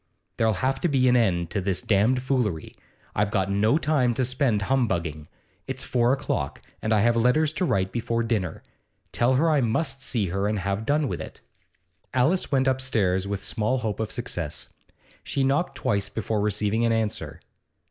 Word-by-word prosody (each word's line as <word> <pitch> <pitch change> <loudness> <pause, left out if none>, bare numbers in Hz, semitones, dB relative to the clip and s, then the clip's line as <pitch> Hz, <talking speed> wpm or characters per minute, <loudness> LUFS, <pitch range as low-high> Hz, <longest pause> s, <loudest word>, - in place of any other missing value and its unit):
There'll 110 -1 +2
have 135 0 +1
to - - +2
be 135 -4 +2
an 125 - +5
end 90 -8 +1
to 100 - -1
this 95 -1 -1
damned 115 +5 +2
foolery. 120 - -1 0.4
I've 105 0 +1
got 100 -2 0
no 110 +7 +3
time 140 -7 +1
to 130 - +1
spend 125 -5 +1
humbugging. 85 - -1 0.4
It's - - -3
four 120 0 +2
o'clock, 135 - -2 0.2
and 110 - -2
I 110 -2 +4
have 120 +2 +3
letters 125 +7 +3
to 185 - 0
write 95 - 0
before 115 0 -1
dinner. 105 -8 -2 0.5
Tell 125 +2 +2
her 155 +6 +3
I 150 -3 +3
must 135 +4 -1
see 115 -8 -1
her, 100 +3 -1
and 105 0 0
have 100 +3 -2
done 145 0 +2
with - - -4
it.' - - -9 0.7
Alice 155 +9 +2
went 135 -2 +2
upstairs 110 -8 +1
with 100 -1 -3
small 110 +6 0
hope 110 -4 -3
of 110 - -2
success. - - -4 0.5
She 135 - -1
knocked 140 +3 +1
twice 100 -6 0
before 110 -1 -2
receiving 105 +2 0
an 115 - +2
answer. 110 -2 -2
115 Hz, 180 wpm, -25 LUFS, 100-130 Hz, 0.7 s, an